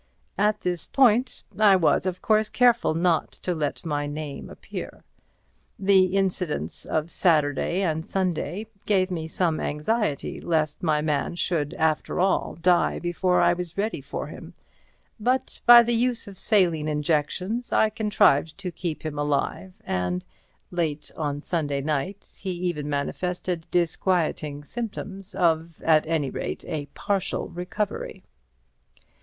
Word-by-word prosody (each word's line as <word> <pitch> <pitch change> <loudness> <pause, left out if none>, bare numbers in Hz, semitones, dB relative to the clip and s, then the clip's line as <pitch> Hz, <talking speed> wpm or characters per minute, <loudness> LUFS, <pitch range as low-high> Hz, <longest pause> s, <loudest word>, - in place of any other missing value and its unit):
At 210 +1 +2
this 180 -2 -2
point 255 -1 +3 0.2
I 205 -2 +7
was 180 +1 +2
of 185 0 -4
course 215 0 +3
careful 240 -9 +3
not 170 -1 +1
to 180 - -3
let 155 0 -3
my 145 -2 -1
name 145 -1 -6
appear. - - -8 0.7
The 190 -1 +5
incidence 180 - -1
of 155 +2 -2
Saturday 160 +2 +2
and 160 -3 0
Sunday 185 +2 -2 0.2
gave 190 -2 +2
me 160 -3 -3
some 165 -1 0
anxiety 150 +1 -1
lest 155 -2 0
my 155 -4 +1
man 150 +1 -1
should 165 -4 -1
after 160 +1 0
all 190 +1 +1
die 175 +1 +3
before 175 +1 +1
I - - +5
was 175 -1 -5
ready 210 +3 -1
for - - -5
him, - - -10 0.6
but 255 +4 0
by 240 0 +11
the 240 +1 0
use 235 -1 0
of 195 -2 -10
saline 175 -8 +2
injections 160 +9 -1
I 220 - +3
contrived 180 -8 +2
to 190 -3 -4
keep 170 -3 -5
him 150 -2 -3
alive 145 +5 -1
and, 90 0 -2 0.5
late 160 -4 -2
on 145 -2 -2
Sunday 145 -5 -1
night, 155 +7 -3
he 190 - -5
even 175 -4 -3
manifested 175 +4 -2
disquieting 165 -4 0
symptoms 195 -1 -6
of 165 -3 +1
at 155 -1 +4
any 155 -4 0
rate - - -5
a 155 -4 -4
partial 200 -3 -1
recovery. 180 +4 -4
175 Hz, 140 wpm, -25 LUFS, 155-195 Hz, 0.7 s, by